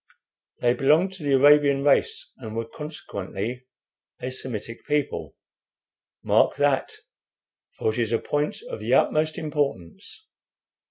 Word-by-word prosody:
They 120 0 +3
belonged 160 +9 +3
to 190 -5 -9
the 140 -1 +1
Arabian 140 0 +5
race, 145 -1 +1
and 110 -4 -8
were 115 0 -2
consequently 125 -5 -6 0.5
a 125 - -4
Semitic 115 -3 -5
people. 150 -1 -1 0.9
Mark - - +3
that, 145 -1 +1 0.9
for 110 - 0
it 120 - -4
is 115 -2 0
a 115 - +3
point 150 - -2
of - - -6
the - - +1
utmost 155 0 +2
importance. 145 - -4
140 Hz, 125 wpm, -25 LUFS, 115-150 Hz, 0.9 s, Arabian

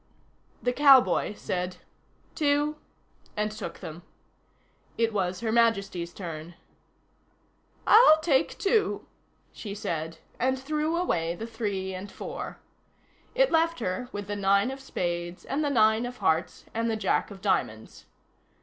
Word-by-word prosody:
The 245 - +1
cowboy 265 -6 +5
said: 180 -2 -3 0.6
"Two," 295 0 +1 0.6
and 210 0 0
took 215 - -7
them. 160 +2 -8 1.0
It 230 -1 +1
was 185 -2 -1
Her 225 -2 -1
Majesty's 195 -7 +1
turn. 170 -2 -7 1.3
"I'll 430 -8 +8
take 305 -2 +1
two," 410 +1 +1 0.5
she 205 -2 -7
said, 165 -4 -4 0.2
and 260 +2 +1
threw 305 +4 -1
away 170 - 0
the 220 - -6
three 205 -5 -3
and 185 +2 -7
four. - - -6 0.8
It - - +4
left 330 0 +2
her 225 +3 -3
with 205 0 -5
the 205 +1 -4
nine 200 +4 +2
of 270 - -7
spades 175 -8 -4
and 285 +3 -1
the 290 - +1
nine 220 -2 +3
of 250 0 -8
hearts, 160 -3 0
and 230 +1 0
the 220 - 0
Jack 215 - 0
of 200 -2 -10
diamonds. 110 - -2
220 Hz, 135 wpm, -27 LUFS, 185-270 Hz, 1.3 s, I'll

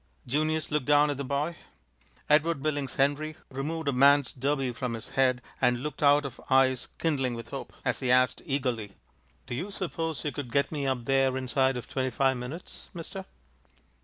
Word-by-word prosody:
Junius 155 +5 0
looked 150 -3 0
down 145 0 +5
at 140 - -4
the 140 - -3
boy. 140 +5 -1 0.7
Edward 150 -1 +3
Billings 145 -3 -1
Henry 145 +3 +1 0.2
removed 150 +4 -3
a 140 - +2
man's 140 +1 +5
derby 135 0 0
from 120 0 -3
his 110 - -7
head 125 -2 +2 0.2
and 125 0 +2
looked 150 - -5
out 145 0 +5
of 140 - -7
eyes 130 -1 +4
kindling 135 -7 0
with 115 0 -8
hope, 135 - -6
as 125 - 0
he 130 - -2
asked 125 0 +4
eagerly: 125 - -2 0.5
"Do - - -6
you 175 +11 -3
suppose 165 -7 -3
you 150 - 0
could 140 -5 -6
get 140 +3 +1
me 145 -3 -2
up 125 -3 -1
there 135 0 +2
inside 130 0 +1
of 120 - -7
twenty 130 -1 -1
five 130 +1 +2
minutes, 125 +8 -7
mister?" 185 +3 -6
135 Hz, 185 wpm, -28 LUFS, 130-150 Hz, 0.7 s, down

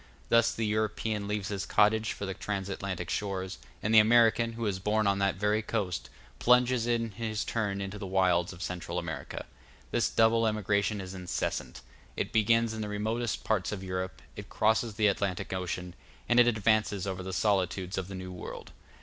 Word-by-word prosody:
Thus 115 0 +5
the 115 - -2
European 105 -1 -1
leaves 105 -1 -2
his 100 -2 -3
cottage 110 +1 +3
for 100 - -5
the 95 - -3
trans 100 -1 -4
Atlantic 95 -3 -4
shores; 95 -3 -3 0.2
and 110 - +1
the 110 - +10
American, 115 +1 +4
who 115 0 -4
is 100 -3 -1
born 105 +2 +1
on 100 0 +2
that 100 -1 +2
very 105 +3 +1
coast, 105 -5 -2 0.3
plunges 125 -1 +4
in 115 -1 0
his 110 +1 -3
turn 105 -4 -1
into 100 +1 -5
the 100 - -5
wilds 90 -2 +2
of 90 0 -8
Central 90 -2 -4
America. - - -5 0.5
This - - +2
double 115 0 +4
emigration 105 -1 0
is 95 0 -7
incessant; 90 -2 -3 0.4
it - - -2
begins 115 +1 +3
in 110 - -4
the 105 - -3
remotest 110 +3 -2
parts 110 -4 0
of 100 -2 -5
Europe, 90 -5 -4
it - - -8
crosses 110 0 +1
the 110 -1 +2
Atlantic 100 -2 0
Ocean, 90 -1 -3 0.3
and 120 0 +4
it 120 - +7
advances 110 -3 +2
over 95 -1 -3
the 95 0 -5
solitudes 95 -1 0
of 95 -2 -3
the 95 - -7
New 95 0 -6
World. 90 - -8
105 Hz, 185 wpm, -30 LUFS, 95-110 Hz, 0.5 s, the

